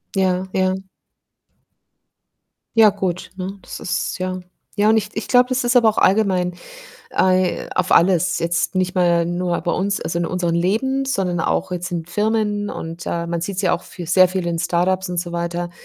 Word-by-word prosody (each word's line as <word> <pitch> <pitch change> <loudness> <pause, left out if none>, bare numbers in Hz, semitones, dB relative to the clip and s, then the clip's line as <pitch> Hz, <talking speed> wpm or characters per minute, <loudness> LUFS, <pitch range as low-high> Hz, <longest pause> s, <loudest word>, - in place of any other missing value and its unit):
Ja, 185 -1 +1
ja. 185 0 +2 2.0
Ja, 220 -2 +7
gut, 185 -3 -3
ne, 190 +1 -5
das - - -8
ist 185 - -2
ja 185 0 -3 0.4
ja, 210 +1 +3
und 220 - +5
ich 210 -1 0
ich 220 - -4
glaube, 250 0 +4
das 255 +1 +1
ist 245 +1 +1
aber 230 -2 +6
auch 215 - 0
allgemein 185 -3 +2 0.6
ei 185 -1 +1
auf 185 0 +1
alles, 180 0 +3
jetzt 170 +3 0
nicht 185 0 -1
mal 170 -2 +3
nur 175 0 -1
bei 170 - -2
uns, 200 +2 -1
also 170 - -2
in 170 - -1
unseren 175 -2 -1
Leben, 265 +10 0
sondern 190 -10 -1
auch 160 - -1
jetzt 180 0 -4
in 165 -2 -2
Firmen 210 +1 0
und, 165 +1 -7
äh, 170 0 -2
man 170 -1 -2
sieht's 190 +2 -3
ja 180 - +2
auch - - -2
für 175 - -9
sehr 185 +1 +6
viel 185 0 -3
in 165 -1 -2
Start-ups 180 +2 0
und 175 -1 -3
so 175 -1 -6
weiter, 170 0 -3
185 Hz, 190 wpm, -20 LUFS, 175-200 Hz, 2.0 s, Ja